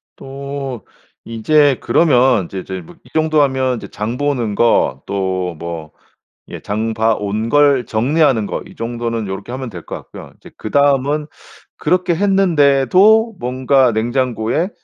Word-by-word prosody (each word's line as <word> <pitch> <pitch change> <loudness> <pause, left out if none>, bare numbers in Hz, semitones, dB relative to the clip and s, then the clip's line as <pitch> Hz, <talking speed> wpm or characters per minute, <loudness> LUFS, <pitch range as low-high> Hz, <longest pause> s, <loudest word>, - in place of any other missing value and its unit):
또 135 -3 -7 0.4
이제 140 +4 +2
그러면 125 - +3
이제 95 +2 -6
이제 95 0 -6
뭐 80 - -15
이 125 - -20
정도 155 -1 +2
하면 130 -2 +1
이제 - - -8
장보는 120 0 -2
거, 85 - +2
또 95 -3 -2
뭐 85 -2 -6 0.6
예 - - -8
장봐 110 +1 0
온 105 +3 -3
걸 145 -3 +3
정리하는 130 -1 +1
거, - - -4
이 - - -14
정도는 115 -1 -3
요렇게 95 +4 -6
하면 130 -1 -5
될 90 -5 -9
것 - - -6
같고요. - - -11
이제 - - -15
그다음은 145 +4 +1 0.5
그렇게 180 +2 +1
했는데도 195 - +3
뭔가 130 +1 +2
냉장고에 120 - -1
125 Hz, 270 characters per minute, -17 LUFS, 110-145 Hz, 0.6 s, 그러면